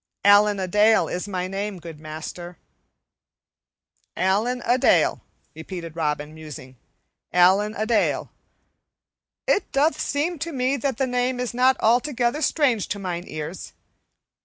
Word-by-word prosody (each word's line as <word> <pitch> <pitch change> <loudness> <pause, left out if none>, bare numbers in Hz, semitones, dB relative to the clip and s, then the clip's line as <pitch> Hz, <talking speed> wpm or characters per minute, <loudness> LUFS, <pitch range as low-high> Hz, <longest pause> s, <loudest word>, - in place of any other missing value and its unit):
"Allen 205 0 +6
a 185 - -2
Dale 210 +4 +4
is 180 +3 -4
my 185 -2 -3
name, 195 +1 -4
good 165 -3 -10
master." 160 +3 -8 1.6
"Allen 215 +7 +1
a 245 +2 +2
Dale," - - +3 0.3
repeated 165 0 -8
Robin, 150 -2 -2
musing. 150 -5 -10 0.6
"Allen 190 +5 +4
a 215 - -1
Dale. 220 -1 0 1.1
It 400 - +1
doth 295 +4 +1
seem 305 +4 -1
to 335 +3 -4
me 260 -1 0
that 275 -2 -2
the 265 - +1
name 250 0 -1
is 250 -1 -3
not 255 +2 +3
altogether 245 +3 +1
strange 270 - +1
to 205 - -3
mine 180 -3 -4
ears. 155 +3 -7
210 Hz, 135 wpm, -23 LUFS, 175-250 Hz, 1.6 s, Allen